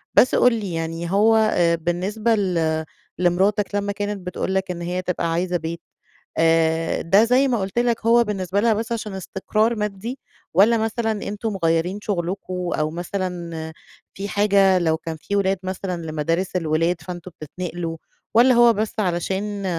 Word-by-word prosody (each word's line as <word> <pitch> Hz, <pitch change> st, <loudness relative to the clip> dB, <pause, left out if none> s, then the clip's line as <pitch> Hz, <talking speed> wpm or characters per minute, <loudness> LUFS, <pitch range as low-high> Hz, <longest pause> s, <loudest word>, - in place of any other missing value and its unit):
بس 255 Hz, -, +5 dB
قل 250 Hz, -1 st, +5 dB
لي 205 Hz, -6 st, -3 dB
يعني 165 Hz, +1 st, -3 dB
هو 215 Hz, +3 st, +4 dB
آآ 175 Hz, -6 st, +3 dB
بالنسبة 190 Hz, +7 st, 0 dB
ل 165 Hz, -5 st, 0 dB, 0.3 s
لمراتك 195 Hz, +4 st, +1 dB
لمّا 205 Hz, 0 st, 0 dB
كانت 205 Hz, -2 st, -4 dB
بتقول 190 Hz, +1 st, -2 dB
لك 190 Hz, -1 st, 0 dB
إن 175 Hz, -1 st, -6 dB
هيّ 180 Hz, +1 st, -2 dB
تبقى 170 Hz, -2 st, -2 dB
عايزة 175 Hz, +1 st, 0 dB
بيت، 165 Hz, +1 st, -5 dB, 0.6 s
آآ، 165 Hz, 0 st, +2 dB
ده- 195 Hz, +6 st, +4 dB
زي 255 Hz, +4 st, +3 dB
ما 240 Hz, -4 st, +1 dB
قلت 195 Hz, +5 st, -2 dB
لك- 240 Hz, -2 st, 0 dB
هو 235 Hz, +1 st, +6 dB
بالنسبة 195 Hz, -2 st, -2 dB
لها 225 Hz, 0 st, +3 dB
بس 225 Hz, +2 st, -3 dB
عشان 220 Hz, -3 st, -3 dB
استقرار 215 Hz, +4 st, -1 dB
مادي؟ 210 Hz, +4 st, -4 dB, 0.3 s
والّا 215 Hz, +6 st, +5 dB
مثلًا 225 Hz, +1 st, -1 dB
أنتم 210 Hz, +1 st, -3 dB
مغيرين 165 Hz, +4 st, +1 dB
شغلكم 180 Hz, -1 st, -3 dB
أو 155 Hz, 0 st, -1 dB
مثلًا 170 Hz, -2 st, -4 dB, 0.4 s
في 195 Hz, +1 st, -4 dB
حاجة 200 Hz, -2 st, +4 dB
لو 160 Hz, -2 st, +1 dB
كان 160 Hz, -1 st, -6 dB
في 200 Hz, +6 st, -4 dB
ولاد 195 Hz, -1 st, +2 dB
مثلًا، 185 Hz, -2 st, -4 dB
لمدارس 165 Hz, +4 st, -2 dB
الولاد 165 Hz, 0 st, 0 dB
فأنتم 180 Hz, +2 st, -8 dB
بتتنقلوا؟ 170 Hz, +1 st, -5 dB, 0.4 s
والّا 250 Hz, +2 st, +6 dB
هو 235 Hz, -1 st, +6 dB
بس 215 Hz, +1 st, -2 dB
علشان 195 Hz, +2 st, -2 dB
190 Hz, 160 wpm, -22 LUFS, 170-210 Hz, 0.6 s, هو